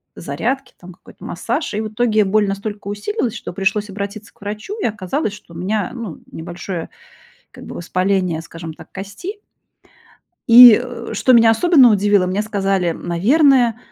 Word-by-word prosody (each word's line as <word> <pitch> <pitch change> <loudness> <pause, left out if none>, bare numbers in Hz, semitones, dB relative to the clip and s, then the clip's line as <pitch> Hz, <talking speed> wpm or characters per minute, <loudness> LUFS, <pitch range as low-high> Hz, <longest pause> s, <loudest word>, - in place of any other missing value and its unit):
зарядки, 270 +1 -4
там 180 0 -12
какой-то - - -18
массаж. 310 - -3
И 205 - -2
в 220 - -3
итоге 215 -1 +1
боль 210 +2 +2
настолько 200 +1 -5
усилилась, 225 - -3
что - - -7
пришлось 205 +2 -1
обратиться 200 +1 -7
к - - -33
врачу, 210 - -6
и - - -1
оказалось, 215 - -2
что 190 -4 -14
у - - -10
меня, 195 +2 -2
ну, 230 -9 -7
небольшое 175 +1 -6 0.6
как - - -13
бы - - -9
воспаление, 185 -1 -1
скажем 165 0 -9
так, - - -15
кости. 280 - -8 1.1
И, 235 -1 +10
э, - - -8
что 255 - +2
меня 230 -2 +6
особенно 265 +1 +5
удивило, 205 -2 +3
мне 190 +3 -1
сказали: 195 -4 -1
"Наверное, 240 - +2
205 Hz, 160 wpm, -18 LUFS, 185-230 Hz, 1.1 s, И